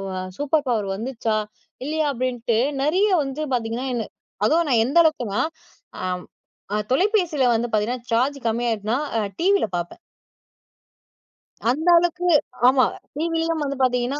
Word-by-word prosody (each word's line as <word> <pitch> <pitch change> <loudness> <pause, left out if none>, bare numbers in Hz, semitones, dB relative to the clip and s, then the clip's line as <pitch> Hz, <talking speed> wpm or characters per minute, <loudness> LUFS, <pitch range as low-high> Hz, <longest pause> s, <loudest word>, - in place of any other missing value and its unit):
அ, - - -3 0.2
super 290 0 +1
power 215 -5 0
வந்துச்சா? 225 -1 -2 0.5
இல்லையா? 310 +1 0
அப்படின்ட்டு 240 -2 -1 0.2
நெறய 365 +9 +3 0.2
வந்து 270 +3 -5
பாத்தீங்கனா 235 +2 -2
என்ன 230 -2 -1 0.4
அதுவும் 325 +5 +3
நான் 225 -3 +4
எந்த 280 +7 0
அளவுக்குனா. 245 -11 +1 0.6
ஆம் 180 -1 -2 0.5
ஆ, - - +1 0.2
தொலைபேசில 355 - +2
வந்து 235 +2 0
பாத்தீங்கனா, 225 +3 0
சார்ஜ் 260 +5 +2
கம்மியாடுச்சுனா. 225 0 0 0.2
அ, - - +2 0.2
டிவில 395 - +3
பாப்பேன். 175 0 -4 1.7
அந்த 310 +7 0
அளவுக்கு 350 +1 +1 0.4
ஆமா 260 0 +5 0.3
டிவிலயும் 330 0 -1
வந்து 280 0 -2
பார்த்தீங்கன்னா, 250 +2 +1
260 Hz, 125 wpm, -23 LUFS, 230-315 Hz, 1.7 s, ஆமா